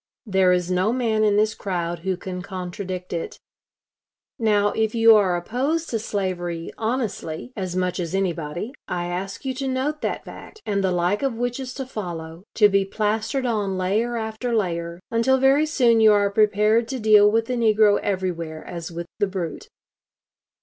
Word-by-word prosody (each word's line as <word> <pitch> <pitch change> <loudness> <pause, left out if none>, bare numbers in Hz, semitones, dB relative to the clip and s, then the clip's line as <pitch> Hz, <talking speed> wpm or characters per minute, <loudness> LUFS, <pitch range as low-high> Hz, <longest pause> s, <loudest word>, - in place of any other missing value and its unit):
There 190 -3 +3
is 180 0 +1
no 185 +4 +2
man 230 -3 +1
in 210 -1 +3
this 215 +1 +2
crowd 175 -5 -3
who 185 +1 -2
can 180 -1 -6
contradict 185 -1 -6
it. 170 - -4 1.0
Now, 205 -2 +3
if 220 +1 -1
you 225 -1 +7
are 190 -4 +3
opposed 275 - -2
to 225 - 0
slavery 180 -5 -3
honestly, 225 -4 -3
as 185 -4 -4
much 185 0 -1
as 170 +1 -3
anybody, 175 +2 -2 0.2
I 175 -1 -2
ask 185 +6 -5
you 265 - -1
to 270 +1 -4
note 265 +4 -1
that - - -3
fact, 435 - -11
and 200 -2 0
the 190 - +2
like 180 +3 +1
of 270 -4 0
which 245 +1 -2
is 255 -1 -6
to 265 - -4
follow, 175 -7 -7
to 210 - +6
be 200 -1 +2
plastered 215 +6 -1
on 205 -5 -1
layer 215 +6 0
after 220 +2 -3
layer, 170 -4 -2
until 235 +3 +3
very 270 +4 +4
soon 240 -7 +3
you 215 -1 +7
are 205 -1 +2
prepared 215 +2 +3
to 265 0 -4
deal 210 -2 +6
with 225 +1 +1
the 250 - -3
negro 215 -3 +4
everywhere 170 -5 -3
as 170 -1 -6
with 170 +1 -5
the 205 - +2
brute. 185 -4 -5
205 Hz, 175 wpm, -23 LUFS, 180-230 Hz, 1.0 s, you